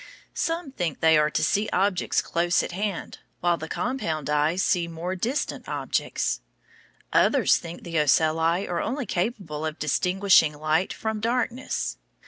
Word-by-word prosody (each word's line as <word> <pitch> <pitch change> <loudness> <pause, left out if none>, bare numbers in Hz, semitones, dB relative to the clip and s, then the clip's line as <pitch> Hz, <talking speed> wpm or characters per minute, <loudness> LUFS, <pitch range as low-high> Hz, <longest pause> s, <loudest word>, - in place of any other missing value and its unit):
Some 330 -3 -2
think 175 - -3
they 160 0 +5
are 150 0 +4
to - - -1
see 210 +1 +1
objects 190 -1 +1
close 170 +1 +1
at - - -5
hand, 195 0 -4 0.2
while 175 -1 +2
the 160 - -6
compound 160 - -2
eyes 155 +5 +2
see 175 -2 +1
more 170 +3 -4
distant 240 +10 -2
objects. - - -1 0.7
Others - - +4
think 170 0 -8
the 165 -2 -1
ocelli 160 +4 +2
are 175 - -1
only 260 +3 -2
capable 180 -6 -3
of 155 -1 -3
distinguishing 180 0 +3
light 155 +4 +1
from 220 -1 -3
darkness. 245 +3 -1
175 Hz, 145 wpm, -25 LUFS, 160-210 Hz, 0.7 s, they